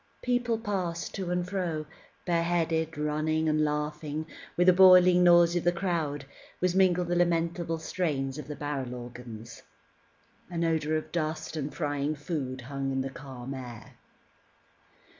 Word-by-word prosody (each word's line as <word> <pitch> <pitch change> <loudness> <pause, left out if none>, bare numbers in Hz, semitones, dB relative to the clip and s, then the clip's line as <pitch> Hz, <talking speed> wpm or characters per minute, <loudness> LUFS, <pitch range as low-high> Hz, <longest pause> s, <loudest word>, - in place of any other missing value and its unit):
People 245 -2 +1
passed 185 -6 -3
to 190 -3 -4
and 180 0 -1
fro, 175 -5 -2 0.4
bareheaded, 165 -2 0
running, 155 +1 0
and 155 0 +2
laughing; 150 +1 -2
and - - -19 0.3
with 175 - +4
the 185 - +7
bawling 180 -1 +7
noise 175 -1 +6
of 175 - 0
the 175 - +4
crowd 165 -6 -2 0.3
was 180 -1 +1
mingled 180 -2 +3
the 175 - 0
lamentable 170 -1 +1
strains 150 -5 -2
of 150 - -7
the 150 - -5
barrel 135 -4 -4
organs. 120 -2 -9 0.9
An 170 -1 -2
odour 155 -1 +1
of 155 - -3
dust 155 -1 -3
and 150 -1 -3
frying 145 -1 -1
food 140 -4 -4
hung 135 +1 -3
in 135 0 0
the 135 0 -4
calm 135 -2 -8
air. 120 -4 -9
160 Hz, 150 wpm, -29 LUFS, 145-175 Hz, 0.9 s, the